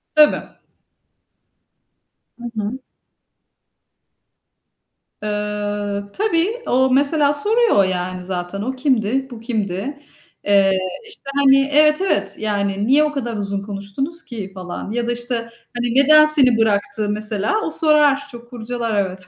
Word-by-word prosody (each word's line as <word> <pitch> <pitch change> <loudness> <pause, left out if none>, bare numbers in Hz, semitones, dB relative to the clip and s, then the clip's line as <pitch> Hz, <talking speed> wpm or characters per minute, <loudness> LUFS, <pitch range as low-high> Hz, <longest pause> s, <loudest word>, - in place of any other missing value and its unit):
Tabii. 300 -1 +4 2.0
Hı - - -12
hı. 215 +4 -4 2.4
Eee, 205 -1 -3
tabii. 420 +3 -1
O 260 +1 +2
mesela 285 +2 +3
soruyor, 430 - +2
yani, 185 0 -4
zaten, 180 +1 -5
"O 260 +5 -4
kimdi, 260 -1 0
bu 235 - -9
kimdi?" 225 +3 -4 0.4
Eee, 200 -1 +3 0.4
işte, 440 -11 -8
hani 275 -1 +4
Evet, 300 +2 +4
evet. 200 - 0
Yani, 200 -1 -2
"Niye 280 +4 +4
o 300 - -1
kadar 240 -6 -4
uzun 200 -1 -3
konuştunuz 210 +11 -2
ki?" 205 -6 -7
falan. 185 +1 -7
Ya 235 +1 -2
da, - - 0
işte, 240 +1 -2 0.4
hani, 240 0 -2
"Neden 305 +3 +6
seni 275 -6 +6
bıraktı?" 215 -1 +1
mesela. 215 - 0
O 320 - -3
sorar, 300 -3 +3
çok 240 0 -13
kurcalar, 240 -1 -4
evet. 185 0 0
240 Hz, 125 wpm, -19 LUFS, 205-285 Hz, 2.4 s, Neden